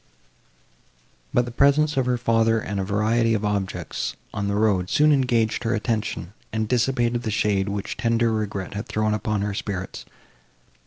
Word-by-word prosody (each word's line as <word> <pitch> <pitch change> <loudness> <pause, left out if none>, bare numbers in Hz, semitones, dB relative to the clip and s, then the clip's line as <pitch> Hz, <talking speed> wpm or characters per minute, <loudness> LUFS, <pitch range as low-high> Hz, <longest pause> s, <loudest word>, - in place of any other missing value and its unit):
But 125 - +2
the 120 - -6
presence 145 +4 +3
of 130 -2 +1
her 125 -1 +2
father 115 -1 +2
and 100 -2 -4
the - - 0
variety 110 +4 +2
of 105 0 -1
objects, 100 -2 -2 0.2
on 100 -1 -2
the 100 - 0
road, 100 -4 +2
soon 150 +6 +4
engaged 120 -4 +1
her 115 0 +1
attention, 110 -4 -2 0.2
and 110 0 -1
dissipated 120 0 +1
the 120 - -3
shade, 100 -2 +1
which 100 0 -4
tender 115 0 +2
regret 100 -4 -3
had 100 +2 -5
thrown 110 0 0
upon 105 -1 -1
her 105 -1 -2
spirits. 95 -2 -5
110 Hz, 165 wpm, -24 LUFS, 100-120 Hz, 0.2 s, soon